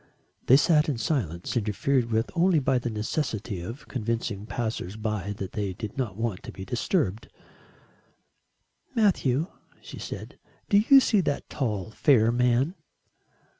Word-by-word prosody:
They 130 - +8
sat 150 +1 +3
in 135 - -1
silence, 115 - -2
interfered 115 +3 +1
with 110 0 0
only 175 0 +3
by 135 -3 +2
the 120 - -3
necessity 110 - -3
of 115 - -8
convincing 115 -4 -3
passers 110 -3 -3
by 105 -2 -3
that 95 -2 -6
they 100 -3 -2
did 105 +2 -7
not 120 -8 -3
want 115 -5 -2
to - - -8
be 95 - -8
interrupted. 115 - -1 1.7
"Matthew," 165 - +2 0.3
she - - -10
said, - - -7 0.3
"do 200 0 +6
you 275 -1 +9
see 210 -5 +3
that 145 -4 -2
tall 110 -6 -2
fair 115 -2 +4
man?" 125 +6 +2
115 Hz, 140 wpm, -27 LUFS, 105-140 Hz, 1.7 s, you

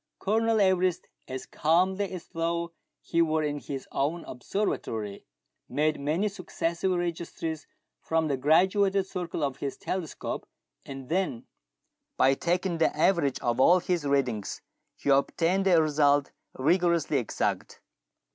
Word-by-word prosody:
Colonel 225 +2 +1
Everest, 185 -2 +2 0.2
as 130 0 -5
calmly 185 +5 +1
as 180 -3 -7
though 170 +1 -2 0.3
he 170 - +1
were 160 -1 +2
in 145 -1 -2
his 135 -2 -6
own 160 +5 -1
ob 125 - -9
servatory, 110 - -3 0.4
made 155 +1 +1
many 155 +9 0
successive 185 -2 -2
registries 170 -2 -3 0.3
from 160 -1 0
the 140 - +1
graduated 190 +7 +3
circle 180 -4 -4
of 135 -2 -1
his 140 -1 -4
telescope, 180 -5 -4 0.4
and 135 -2 -8
then, 175 -8 -1 0.7
by 135 +1 +5
taking 175 +3 -1
the 160 - +2
average 155 -5 +2
of 120 0 0
all 175 +7 +6
his 175 -2 -1
readings, 130 -7 -1 0.3
he - - -4
obtained 165 +7 +2
a 175 -3 +6
result 145 -2 +3 0.3
rigorously 170 0 +2
exact. 120 - -2
165 Hz, 130 wpm, -28 LUFS, 140-185 Hz, 0.7 s, all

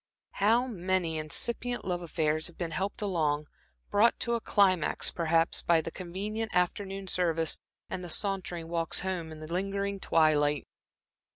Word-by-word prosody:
How 230 +5 +3
many 185 -7 -1
incipient 235 +10 -1
love 180 -1 -1
affairs 155 -2 0
have 175 - -7
been 170 -2 -3
helped 200 +4 -2
along, 155 -6 0 0.5
brought 220 +3 +4
to 235 - +1
a 235 - 0
climax 185 -7 +3
perhaps, 165 0 +2
by 170 -1 +4
the 165 +1 -4
convenient 205 +6 -4
afternoon 195 +2 0
service, 165 -3 +1 0.3
and 180 - -5
the 175 - -6
sauntering 180 -3 -1
walks 165 -1 0
home 180 -3 -3
in 155 0 -9
the 155 +2 -6
lingering 200 +2 -1
twilight! 150 -4 +2
180 Hz, 150 wpm, -30 LUFS, 165-200 Hz, 0.5 s, brought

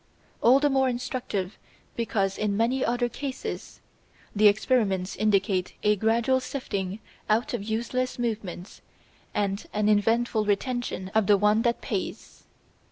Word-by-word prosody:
All 255 +4 +6
the 290 - +3
more 265 -1 +3
instructive 240 -6 -3 0.4
because 200 -4 0
in 205 -2 -1
many 245 +4 +1
other 245 +1 +1
cases 265 +3 -6 0.5
the 210 +1 +6
experiments 205 -3 +1
indicate 195 -3 +1
a 210 0 +4
gradual 230 +5 +2
sifting 200 -8 -4 0.3
out 220 +4 +1
of 240 - -2
useless 235 +4 -2
movements 215 -6 -4 0.5
and 200 0 -1
an 210 0 +1
eventful 225 +2 +2
retention 210 -2 -2
of 220 -3 +2
the 205 - +6
one 210 +2 +3
that 235 0 0
pays. - - -5
220 Hz, 130 wpm, -26 LUFS, 200-245 Hz, 0.5 s, All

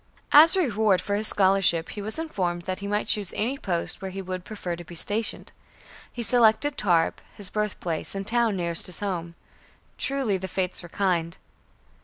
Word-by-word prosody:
As 320 +5 +8
a - - +2
reward 215 - +2
for 200 +3 -3
his 210 +1 +1
scholarship 190 -4 +3
he 205 - -6
was 215 +6 -1
informed 180 - -2
that 185 +1 -4
he 200 - -6
might 205 +1 -1
choose 205 -4 +1
any 240 +6 -1
post 180 -10 -2
where 190 - -4
he 190 +1 -7
would 185 -1 -5
prefer 185 -5 -5
to 175 - -10
be 175 +1 -12
stationed. 210 +6 -2 0.6
He 240 - -4
selected 240 +5 +4
Tarbes, 170 -5 +1
his 200 -3 -4
birthplace, 200 -6 -3
and 195 0 -4
the - - 0
town 235 -3 +2
nearest 170 -2 +2
his 180 - -2
home. 170 -4 -4 0.6
Truly, 260 -8 -1
the 190 - -5
fates 185 0 -2
were 175 - -11
kind! 170 -3 -1
195 Hz, 190 wpm, -25 LUFS, 175-215 Hz, 0.6 s, As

